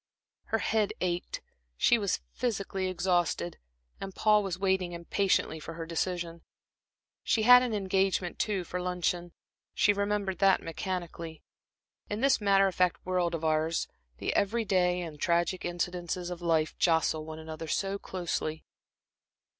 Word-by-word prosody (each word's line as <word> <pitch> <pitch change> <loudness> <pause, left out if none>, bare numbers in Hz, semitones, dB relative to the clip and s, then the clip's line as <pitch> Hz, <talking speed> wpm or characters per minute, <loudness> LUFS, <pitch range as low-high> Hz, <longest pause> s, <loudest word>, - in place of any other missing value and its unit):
Her 225 - 0
head 220 -1 +1
ached, 175 -1 -2 0.4
she 240 - +4
was 200 -3 0
physically 195 -5 -2
exhausted, 175 -2 0 0.4
and 195 -1 -7
Paul 210 -1 +4
was 190 -3 -3
waiting, 190 -2 0
impatiently, 170 -1 0
for 165 +2 -8
her 165 0 -5
decision. 170 0 -3 0.8
She 220 - +1
had 250 +2 +9
an 245 -3 -1
engagement, 190 -2 0
too, 200 -4 0
for 180 +1 -4
luncheon 180 -1 -1 0.4
she 205 - +4
remembered 200 -2 -1
that 195 -1 +5
mechanically.... 170 -2 -5 0.7
In 205 - -2
this 270 -3 +3
matter 195 -1 +4
of 190 - -2
fact 180 -1 +1
world 180 -2 0
of 165 - -6
ours, 155 +1 +1 0.3
the - - -2
every 220 +3 +1
day 180 -2 +2
and 165 -2 -6
the - - -27
tragic 170 +3 +1
incidents 175 0 -2
of 175 -1 -5
life 160 -2 +1
jostle 160 -2 +2
one 155 0 -7
another 160 0 -7
so 195 +4 -1
closely. 165 -4 -3
180 Hz, 145 wpm, -30 LUFS, 170-195 Hz, 0.8 s, had